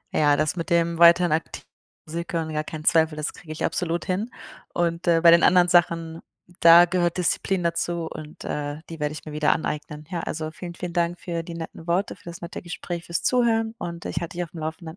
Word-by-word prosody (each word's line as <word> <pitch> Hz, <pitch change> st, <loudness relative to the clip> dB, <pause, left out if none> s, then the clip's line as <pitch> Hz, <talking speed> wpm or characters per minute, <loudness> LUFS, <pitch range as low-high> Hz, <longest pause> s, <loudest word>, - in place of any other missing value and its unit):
Ja, 145 Hz, -1 st, +4 dB
das 155 Hz, +2 st, 0 dB
mit 170 Hz, -2 st, -4 dB
dem 170 Hz, 0 st, +1 dB
weiterhin 170 Hz, 0 st, +6 dB
aktiv 160 Hz, +1 st, -2 dB, 0.4 s
Musik 170 Hz, +3 st, -6 dB
hören, 165 Hz, -2 st, -2 dB
ja, 155 Hz, 0 st, -1 dB
kein 155 Hz, 0 st, -7 dB
Zweifel, 160 Hz, 0 st, +3 dB
das 150 Hz, 0 st, -3 dB
kriege 165 Hz, -2 st, -12 dB
ich 155 Hz, -, -2 dB
absolut 170 Hz, +1 st, -2 dB
hin. 195 Hz, +6 st, -2 dB, 0.4 s
Und, 170 Hz, +1 st, -1 dB
äh, 165 Hz, -1 st, +4 dB
bei 170 Hz, 0 st, +8 dB
den 170 Hz, -, +6 dB
anderen 180 Hz, -1 st, +5 dB
Sachen, 165 Hz, -2 st, +2 dB, 0.4 s
da 170 Hz, +1 st, +9 dB
gehört 175 Hz, -1 st, 0 dB
Disziplin 180 Hz, +1 st, 0 dB
dazu 170 Hz, 0 st, -1 dB
und, 155 Hz, 0 st, -9 dB
äh, 145 Hz, +1 st, -4 dB
die 165 Hz, -, -7 dB
werde 150 Hz, 0 st, -1 dB
ich 155 Hz, -, -9 dB
mir 155 Hz, -, -7 dB
wieder 150 Hz, 0 st, +2 dB
aneignen. 150 Hz, -1 st, -5 dB
Ja, 175 Hz, -, -2 dB
also, 155 Hz, -1 st, -4 dB
vielen, 175 Hz, +1 st, -8 dB
vielen 180 Hz, -1 st, -6 dB
Dank 175 Hz, 0 st, 0 dB
für 170 Hz, -2 st, -3 dB
die 165 Hz, 0 st, -8 dB
netten 165 Hz, 0 st, -8 dB
Worte, 180 Hz, +4 st, 0 dB
für -, -, -24 dB
das 170 Hz, 0 st, -9 dB
nette 170 Hz, -, -7 dB
Gespräch, 175 Hz, 0 st, -6 dB
fürs 170 Hz, -, -2 dB
Zuhören 225 Hz, -3 st, +2 dB
und 170 Hz, -1 st, -6 dB
ich -, -, -2 dB
halte 175 Hz, +1 st, -6 dB
dich 175 Hz, -, 0 dB
auf 170 Hz, -, -10 dB
dem 165 Hz, -, -9 dB
Laufenden. 160 Hz, +1 st, -6 dB
170 Hz, 225 wpm, -24 LUFS, 160-175 Hz, 0.4 s, da